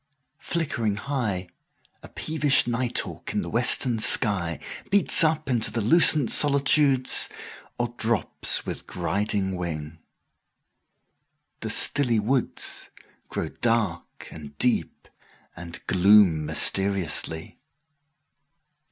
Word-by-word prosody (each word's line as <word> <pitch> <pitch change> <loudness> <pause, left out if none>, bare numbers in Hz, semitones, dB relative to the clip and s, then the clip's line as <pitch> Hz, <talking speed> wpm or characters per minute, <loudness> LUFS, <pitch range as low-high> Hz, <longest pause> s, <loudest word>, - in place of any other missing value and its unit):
Flickering 120 -11 -3
high,5A 105 -8 -8
peevish 155 -3 +1
night 120 +1 -3
hawk - - -9
in - - -2
the - - -8
western 120 -3 +3
sky6Beats 105 - +3
up 155 -1 -1
into 120 -4 -1
the 115 - -5
lucent 150 +2 +3
solitudes,7Or 140 -4 +2
drops 115 -1 0
with - - -7
griding 95 +2 -3
wing. 80 -3 -7 1.6
The - - -7
stilly 125 -6 +2
woods8Grow 125 +4 -5
dark 115 -8 -3
and 75 -2 -13
deep, 125 +6 -2 0.5
and 85 -1 -7
gloom 95 -5 +3
mysteriously. 95 -5 -1
110 Hz, 85 wpm, -23 LUFS, 90-135 Hz, 1.6 s, western